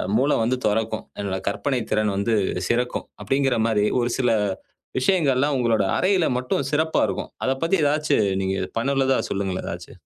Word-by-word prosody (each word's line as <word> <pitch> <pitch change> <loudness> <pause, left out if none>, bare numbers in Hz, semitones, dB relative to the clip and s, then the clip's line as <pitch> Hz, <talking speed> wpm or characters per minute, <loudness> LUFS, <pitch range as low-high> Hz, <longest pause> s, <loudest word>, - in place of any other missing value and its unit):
மூள 135 +5 +3
வந்து 120 +3 +1
தொறக்கும். 110 +1 -1
என்னோட 100 -2 -2
கற்பனைத் 120 +3 -1
திறன் 105 -1 +1
வந்து 100 +3 0 0.4
சிறக்கும் 125 +1 0 0.2
அப்படிங்கற 135 -2 +1
மாரி 105 -2 +2 0.2
ஒரு 120 - 0
சில 130 -2 +2 0.7
விஷயங்கள்லாம் 140 -2 +2
உங்களோட 115 -4 +2
அறையில 185 -2 +2
மட்டும் 130 +2 -1
சிறப்பா 160 +1 +1
இருக்கும். - - -4
அதப் 135 0 -1
பத்தி 170 +4 +2
எதாச்சு 150 +1 +2 0.2
நீங்க 95 0 -1 0.2
பண்ணினதுல 135 +1 +1
சொல்லுங்களேன். 95 -2 -2
எதாச்சு. - - -7
125 Hz, 150 wpm, -23 LUFS, 110-140 Hz, 0.7 s, மூள